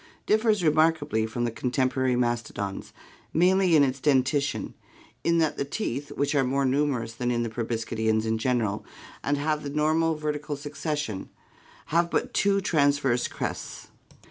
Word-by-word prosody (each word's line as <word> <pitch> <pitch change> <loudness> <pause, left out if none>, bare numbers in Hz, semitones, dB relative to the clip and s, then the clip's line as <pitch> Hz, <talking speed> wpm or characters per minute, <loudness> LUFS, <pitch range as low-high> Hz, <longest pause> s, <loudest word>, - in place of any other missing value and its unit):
differs 215 -3 +2
remarkably 155 -8 +2
from 120 +2 -3
the 120 - 0
contemporary 130 +1 0
mastodons, 120 -5 -2 0.4
mainly 180 +1 +4
in 145 - +6
its 135 0 0
dentition, 140 0 +1 0.5
in 170 0 +2
that 160 -2 +1
the - - 0
teeth, 140 - -3
which 140 +1 0
are 140 -2 +3
more 135 +2 +1
numerous 130 -4 0
than 120 +1 -2
in 120 -1 0
proboscideans 110 -1 -1
in 110 0 0
general 110 -4 0 0.4
and 145 +1 +1
have 150 +1 0
the 145 - -5
normal 155 +2 +1
vertical 150 -1 -3
succession, 145 - -4 0.6
have 170 +1 +3
but - - -1
two 200 0 +3
transverse 145 -8 +2
crests. - - -5
140 Hz, 145 wpm, -26 LUFS, 120-155 Hz, 0.6 s, in